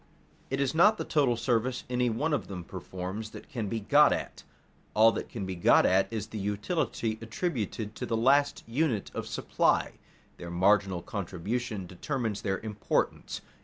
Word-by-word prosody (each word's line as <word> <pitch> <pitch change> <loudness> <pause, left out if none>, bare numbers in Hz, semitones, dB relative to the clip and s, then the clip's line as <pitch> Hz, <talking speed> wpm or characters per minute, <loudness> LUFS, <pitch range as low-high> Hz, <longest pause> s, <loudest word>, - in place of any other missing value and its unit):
It 135 - -1
is 140 -2 +1
not 205 +7 +5
the - - -3
total 135 -7 +2
service 120 +1 0
any 125 0 +1
one 150 +8 0
of 145 - -1
them 90 -3 -6
performs 95 +5 -6
that - - -11
can 120 -8 -3
be 115 +3 -2
got 145 +8 +5
at; - - -3 0.5
all 110 +1 +7
that - - -5
can 105 -5 -5
be 95 - -3
got 85 - +5
at 95 +1 +4
is 110 -2 -3
the 110 - -7
utility 110 - -1
attributed 115 - -3
to - - -4
the 115 - 0
last 140 +5 +3
unit 120 -3 0
of - - -4
supply. - - +1 0.4
Their 85 - -7
marginal 95 0 +2
contribution 100 +2 -3
determines 110 - -3
their 95 -2 -1
importance. 105 -2 -2
110 Hz, 165 wpm, -29 LUFS, 100-130 Hz, 0.5 s, all